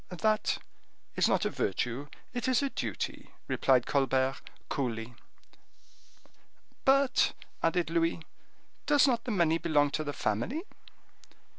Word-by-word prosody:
"That 215 +4 +1 0.6
is - - +3
not - - +2
a - - 0
virtue, 125 +8 -2 0.3
it 245 -1 -2
is 255 +2 +3
a 275 - -1
duty," - - -4 0.2
replied 130 -3 +3
Colbert, 135 -1 +1 0.3
coolly. 120 -3 -3 1.7
"But," 270 -1 +4 0.3
added 165 0 +1
Louis, 165 0 +1 0.7
"does 290 -2 +6
not 240 -4 +1
the - - -4
money 170 -5 +2
belong 145 -4 +2
to 155 - -1
the 145 - -3
family?" 140 - -2
165 Hz, 120 wpm, -30 LUFS, -, 1.7 s, does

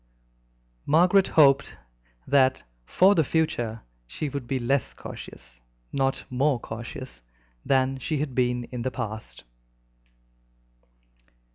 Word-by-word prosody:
Margaret 180 +5 +4
hoped 140 -2 +4 0.5
that 130 -1 +3 0.2
for 190 +2 +5
the 160 - +3
future 120 -8 -1 0.2
she 145 - -4
would 140 -3 -6
be 135 - -1
less 130 +1 -1
cautious, - - -11 0.3
not 135 -1 0
more 135 +1 +1
cautious, 110 - -8 0.4
than 135 0 +1
she 155 +4 -2
had 140 -2 -3
been 125 -1 0
in 125 -2 -4
the 130 - -1
past. 110 - -6
130 Hz, 110 wpm, -26 LUFS, 120-145 Hz, 0.5 s, for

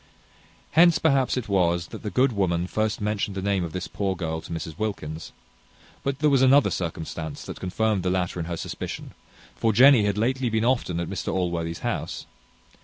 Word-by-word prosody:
Hence, 170 0 +6
perhaps, 135 -5 +2
it 125 - -3
was, 85 -4 +1
that - - -8
the 105 - -4
good 130 +6 +3
woman 90 -5 0
first 110 +3 -1
mentioned 105 -1 -1
the - - -2
name 100 -2 +1
of 85 - -4
this 90 +1 -4
poor 95 -2 -2
girl 80 -2 -3
to - - -11
Mrs 80 +1 -5
Wilkins; 80 -8 -4 0.7
but 140 -1 -1
there 150 +1 +3
was 135 -2 +4
another 135 +2 +5
circumstance 80 -2 -4
that - - -7
confirmed 105 +2 0
the 90 - 0
latter 90 -1 -1
in 80 - -3
her 85 -1 -3
suspicion; - - -6 0.4
for 115 - +1
Jenny 125 0 +7
had 100 -1 0
lately 125 +3 +1
been 110 0 0
often 120 -9 +1
at 85 - -2
Mr - - -3
Allworthy's 85 -2 -2
house. - - -3
100 Hz, 190 wpm, -25 LUFS, 85-120 Hz, 0.7 s, Jenny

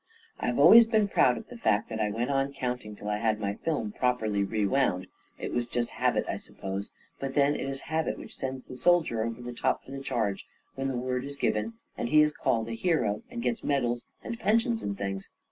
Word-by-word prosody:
I - - -2
have 120 - 0
always 225 +10 +9
been 220 -3 +3
proud - - +4
of 225 - -8
the 245 - -10
fact 105 - +2
that 110 -1 -4
I 105 -1 +1
went 120 +6 -1
on 135 0 0
counting 125 -5 -4
till 105 - -9
I 105 0 0
had 110 -1 +1
my 100 -1 -1
film 115 -4 -2
properly 110 -5 +1
re 105 +1 0
wound. 95 -5 +1 0.3
It - - -5
was 120 -1 0
just 120 0 -1
habit, - - +1
I - - -2
suppose; 95 +1 -5 0.3
but 135 -1 -4
then 145 0 +4
it 135 - -3
is 135 0 -4
habit 160 0 -1
which - - -9
sends 130 -1 -4
the 130 - -9
soldier 160 -6 +3
over 115 +1 -4
the 120 0 -5
top - - 0
for - - -13
the 135 - -5
charge 110 -7 -2 0.3
when 135 0 -2
the 130 -2 -2
word 125 0 -1
is 140 +1 -6
given, 115 -4 0 0.3
and 120 - -1
he 150 +2 +7
is 150 - +2
called 115 -5 0
a - - -5
hero, 115 - +1
and 240 -1 -5
gets 230 -2 -1
medals 120 -4 0 0.2
and 230 -1 -5
pensions 230 +3 +2
and 100 -1 -3
things! 95 -1 -4
125 Hz, 230 wpm, -29 LUFS, 110-140 Hz, 0.3 s, always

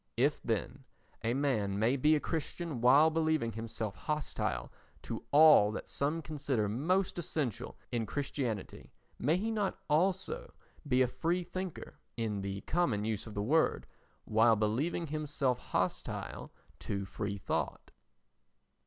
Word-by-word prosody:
If, - - +2
then, - - -2 0.4
a 115 +2 +1
man 110 -9 0
may 115 +5 +3
be 150 +3 +4
a - - +2
Christian 160 -3 -3
while 140 +6 +6
believing 155 -7 +1
himself 110 -1 -4
hostile 145 - -2 0.3
to - - -5
all 145 -8 +8
that - - -5
some 155 +4 -1
consider 140 -7 -1
most 175 - 0
essential 145 - -3
in 115 -3 -1
Christianity, 130 -5 -3 0.3
may 155 +7 +2
he 220 +4 -1
not 210 -3 -1
also 185 +5 0 0.3
be 130 -1 +4
a - - +2
free 170 +8 -1
thinker 185 0 -6 0.2
(in 110 -3 -1
the 100 0 -4
common 135 -12 0
use 110 -1 -2
of 110 - -9
the 100 - -1
word) 155 +8 +2 0.4
while 110 +1 +5
believing 120 +11 0
himself 145 -4 -1
hostile 90 0 -3 0.3
to 100 -1 -3
free 100 +1 -4
thought? - - -3
135 Hz, 135 wpm, -32 LUFS, 110-160 Hz, 0.4 s, all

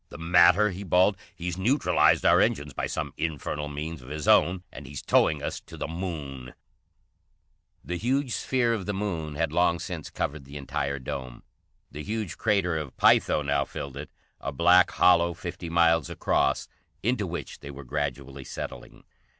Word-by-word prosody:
"The - - -10
matter?" 90 +4 +5
he 95 +2 -7
bawled. 95 +2 +3 0.2
"He's 90 +1 -4
neutralized 125 +10 +3
our - - +6
engines 70 0 0
by - - -2
some - - -4
infernal 75 -2 -3
means 75 +1 -5
of 60 - -12
his 75 0 -5
own, 90 +1 +4
and 70 0 -10
he's 70 -1 -7
towing 75 -2 +3
us - - -3
to - - -13
the - - -3
Moon!" 75 -7 -6 1.3
The 90 - -3
huge 130 +5 0
sphere 120 -1 +1
of 105 -4 -4
the 105 - -1
Moon 85 -7 -3
had 80 0 -1
long 85 0 +3
since 85 -2 -6
covered 75 0 -3
the 70 +2 -9
entire 70 0 -3
dome. 65 -1 -6 0.5
The 75 - -7
huge 105 0 -4
Crater 100 -6 +1
of 75 -4 -6
Pytho 75 - +4
now 70 0 +1
filled 70 0 -7
it, 70 +2 -7 0.3
a 70 - -4
black 90 +5 +5
hollow 85 -1 +4
fifty 85 0 -6
miles 85 -3 +3
across, - - 0 0.4
into 110 -3 0
which 85 0 -6
they 70 - -9
were 70 0 -9
gradually 70 0 -4
settling. - - -8
80 Hz, 170 wpm, -27 LUFS, 70-90 Hz, 1.3 s, our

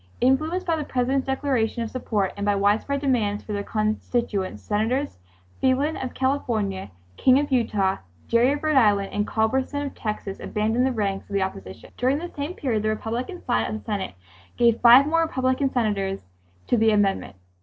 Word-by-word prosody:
Influenced 310 +9 +1
by 335 -2 +1
the 305 - -2
President's 265 0 0
declaration 260 -4 0
of 225 - -6
support, 210 -6 -1
and 200 - -5
by 205 0 +2
widespread 210 +8 +1
demands 220 -7 0
from 210 - -6
their 200 0 -2
constituents, 215 - -2
Senators 225 - -1 0.4
Phelan 270 +4 +2
of 255 -1 -5
California, 225 - -1 0.3
King 255 0 +5
of 285 0 -1
Utah, 205 -6 +1 0.3
Gerry 235 +3 +3
of 295 +1 -5
Rhode 310 -2 +2
Island, 205 -5 +3
and 210 0 -1
Culberson 265 +6 0
of 280 - -5
Texas 210 -3 -5
abandoned 220 +4 0
the - - 0
ranks 200 -5 -2
of 200 - -4
the 195 - +2
opposition. 95 - -7
During 260 +3 +2
this 345 +3 -7
same 290 +5 -4
period 230 -6 -1
the 215 - 0
Republican 235 - -4
side 115 0 +1
of - - -3
the 105 - -13
Senate 195 - -3 0.4
gave 235 -1 +3
five 245 +3 +8
more 330 +2 +2
Republican 260 -3 0
Senators 200 -5 -1 0.4
to 245 - +2
the 225 0 +4
amendment. 205 - +1
235 Hz, 180 wpm, -24 LUFS, 205-265 Hz, 0.4 s, five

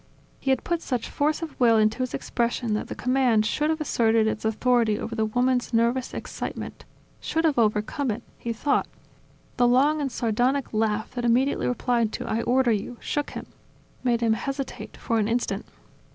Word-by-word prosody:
He 270 - -3
had 265 - +2
put 340 -1 -1
such 250 -7 -3
force 305 +2 0
of 320 - -7
will 230 -3 +5
into 215 +2 +2
his 255 -1 -1
expression 235 -1 -1
that 210 - -2
the - - -6
command 250 -4 +2
should 300 +7 0
have 320 0 0
asserted 225 -6 +2
its 220 - -1
authority 225 0 +2
over 230 - -5
the 220 -1 0
woman's 245 +1 +1
nervous 235 +3 +1
excitement, - - -6 0.3
should 325 +1 -1
have 295 -6 +2
overcome 215 +5 +1
it 225 +2 -3 0.2
he 235 - -3
thought. 280 +6 0 0.7
The 245 -1 +4
long 285 +5 +3
and 275 -2 -2
sardonic 245 +4 0
laugh 215 0 0
that 245 - -4
immediately 245 +4 +2
replied 240 -3 +1
to - - -4
"I 225 - 0
order 250 0 +2
you," 220 +3 -2
shook 290 -1 -2
him, - - -7 0.6
made 240 -2 +1
him 225 -1 +3
hesitate 275 +3 -5
for 230 -1 0
an 210 - +1
instant. 235 +2 -1
240 Hz, 180 wpm, -25 LUFS, 225-265 Hz, 0.7 s, will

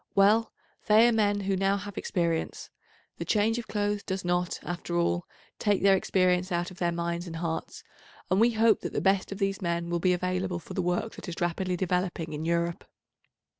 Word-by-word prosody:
Well, 210 +3 +4 0.4
they 220 +2 +7
are - - +4
men 205 -2 +2
who 195 0 0
now 195 +1 +2
have 205 -1 -7
experience; 170 -2 -2 0.5
the - - -3
change 220 +2 +1
of 235 - -7
clothes 205 -1 -1
does 190 -2 -4
not, 175 0 0
after 175 0 -3
all, 175 0 0 0.3
take 205 -3 +1
their 195 -1 +6
experience 185 -1 +1
out 175 +1 -1
of 185 - -13
their 175 -1 +1
minds 170 +1 -3
and 165 - -6
hearts, 170 - -4 0.5
and 190 +3 +4
we 235 +1 +4
hope 220 -1 +4
that - - -5
the - - 0
best 195 0 +1
of 195 - -4
these 195 -1 -1
men 170 -1 -2
will 170 - +1
be 180 +1 +3
available 180 0 -1
for 170 - -9
the - - -1
work 180 +5 -1
that - - -7
is 170 - -5
rapidly 180 +1 -1
developing 180 -3 -1
in 150 +1 -4
Europe. 170 0 0
185 Hz, 205 wpm, -28 LUFS, 175-200 Hz, 0.5 s, they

